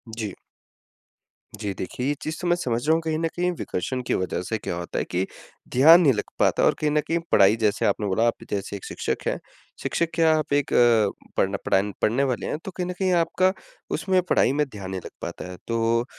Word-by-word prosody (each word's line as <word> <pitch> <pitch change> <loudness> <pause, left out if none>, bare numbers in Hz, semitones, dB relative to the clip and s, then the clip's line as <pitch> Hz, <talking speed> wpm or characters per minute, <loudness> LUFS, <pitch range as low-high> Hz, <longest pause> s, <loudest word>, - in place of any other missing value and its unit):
जी। 110 -3 -4 1.2
जी, 105 -2 -4
देखिए 125 +7 -5
ये 145 - +2
चीज़ 155 0 -4
तो 180 - -2
मैं 175 - +4
समझ 120 -9 -1
रहा 160 - +5
हूँ 165 - +2
कहीं 160 -1 -1
न 165 - +1
कहीं 180 +1 +1
विकर्षण 125 +8 -3
की - - +1
वज़ह 95 -1 -1
से 110 +4 -2
क्या 90 - -4
होता 85 0 -4
है - - -2
कि 90 +2 -1 0.5
ध्यान 160 +7 +8
नहीं 145 -6 +5
लग 105 - -2 0.2
पाता - - +3
और - - +5
कहीं 150 -1 +1
न 150 - +3
कहीं 170 +1 +1
पढ़ाई 100 +2 +6
जैसे 105 -1 +1
आपने 105 - +1
बोला 100 +4 +1
आप 115 - -2
जैसे 100 0 -3
1 100 - -8
शिक्षक - - -3
हैं। - - -1 0.4
शिक्षक 170 - 0
क्या, 165 -1 +4
आप 150 -2 -2
एक 145 -1 +1
अ, 115 -4 +5 0.3
पढ़न 95 +1 +1
पढ़ान 100 +2 +2
पढ़ने 120 +6 +2
वाले 130 -3 -1
हैं। - - -2
तो 190 - -5
कहीं 180 0 -3
न - - -2
कहीं 190 -1 +2
आपका 175 +2 +2 0.4
उसमें 185 -1 +1
पढ़ाई - - +4
में 150 +1 +1
ध्यान 100 -5 -8
नहीं 95 -1 -4
लग - - -6
पाता 90 - -6
है। 90 - -9
तो 115 +1 +1
125 Hz, 230 wpm, -24 LUFS, 105-160 Hz, 1.2 s, ध्यान